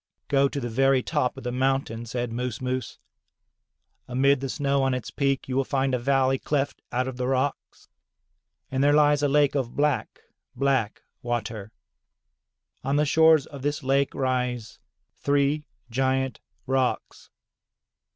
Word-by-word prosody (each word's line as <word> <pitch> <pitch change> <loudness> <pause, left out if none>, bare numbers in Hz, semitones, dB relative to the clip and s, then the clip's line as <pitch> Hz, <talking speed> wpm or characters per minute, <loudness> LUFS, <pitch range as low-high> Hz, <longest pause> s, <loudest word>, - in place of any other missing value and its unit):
"Go 140 0 +3
to 140 - -4
the 120 - -3
very 135 +2 +2
top 145 -6 -1
of - - -8
the 125 - -2
mountain," 130 -3 -1
said 120 0 -3
Moos 125 -1 -3
Moos. 130 -2 -3 1.1
"Amid 135 +2 +3
the 135 0 -4
snow 140 0 0
on 135 -1 +1
its 125 -4 -5
peak 135 -1 0
you 130 - -3
will 135 - +2
find 135 0 0
a 125 - +1
valley 135 +1 +2
cleft 145 -1 -2
out 125 +1 0
of 130 -1 -5
the 125 0 -2
rocks, 135 +2 -2 0.8
and 135 +1 +1
there 145 +1 +5
lies 145 -1 +4
a 145 - +3
lake 145 0 +3
of 130 -4 -2
black, 150 0 0 0.3
black 135 -6 0 0.2
water. 115 -3 -4 1.1
On 135 +2 0
the 150 +1 +3
shores 160 -1 +5
of 140 -2 -10
this 145 +1 -2
lake 135 +1 +1
rise 125 -3 -2 0.4
three 145 +1 +1 0.3
giant 130 +1 0 0.3
rocks. 130 0 -1
135 Hz, 150 wpm, -25 LUFS, 125-140 Hz, 1.1 s, there